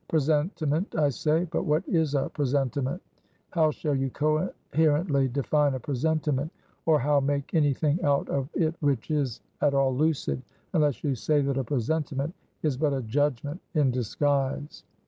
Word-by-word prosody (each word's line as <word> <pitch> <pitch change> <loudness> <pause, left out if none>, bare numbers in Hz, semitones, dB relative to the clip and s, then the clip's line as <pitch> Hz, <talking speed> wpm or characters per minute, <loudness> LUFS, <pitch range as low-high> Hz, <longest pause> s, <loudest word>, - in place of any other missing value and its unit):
Presentiment, 155 +2 0
I 150 -2 +4
say; 155 +5 +1
but - - 0
what 155 +3 +1
is 160 -4 +1
a 135 - +1
presentiment? 140 - -1 0.5
how 160 -3 +3
shall 150 0 -2
you 135 -1 0
coherently 155 0 +1
define 140 +2 +1
a - - -3
presentiment, 150 +2 -1 0.4
or 160 -1 +6
how 145 +2 +3
make 140 0 -1
any 145 -4 +3
thing 155 +4 0
out 140 -1 +2
of 140 0 -2
it 160 -1 +1
which 140 -3 0
is 140 -6 -1 0.2
at 145 -1 +3
all 135 -1 +2
lucid, 140 - 0 0.3
unless 150 -4 +1
you 145 - +1
say 145 +5 +1
that 135 -1 0
a - - 0
presentiment 140 +4 -1 0.3
is 150 -5 +1
but 145 0 +1
a 135 -2 -2
judgment 145 - -1
in 145 -4 +3
disguise? 135 +4 -1
145 Hz, 160 wpm, -27 LUFS, 135-155 Hz, 0.5 s, or